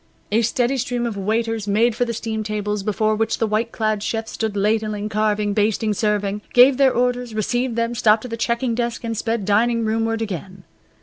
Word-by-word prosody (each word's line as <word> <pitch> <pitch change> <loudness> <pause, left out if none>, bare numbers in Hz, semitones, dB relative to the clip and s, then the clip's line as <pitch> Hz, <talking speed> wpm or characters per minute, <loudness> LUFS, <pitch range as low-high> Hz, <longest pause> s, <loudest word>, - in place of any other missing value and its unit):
A 220 +2 +3
steady 245 +3 +1
stream 245 -1 -2
of 230 -3 -3
waiters 220 +2 -1
made 220 +4 +3
for 245 - +1
the 235 - -3
steam 220 -1 -3
tables 210 -1 -2
before 215 +1 0
which 225 +1 0
the 225 - +1
white 220 +2 -1
clad 215 -2 -1
chefs 225 +1 -3
stood 220 -2 -3
ladling, 210 0 0
carving, 210 -1 0
basting, 215 +1 +1
serving, 205 -1 -1
gave 250 +2 +7
their 275 -1 +5
orders, 245 -1 -1
received 240 +3 -1
them, 230 0 0
stopped 220 -1 +3
at 250 - -8
the - - -2
checking 235 +1 -1
desk, 235 0 -2
and 230 -1 -3
sped 225 -1 -2
dining 230 +3 +2
roomward 225 +1 0
again. 190 -2 -7
220 Hz, 195 wpm, -21 LUFS, 210-235 Hz, -, gave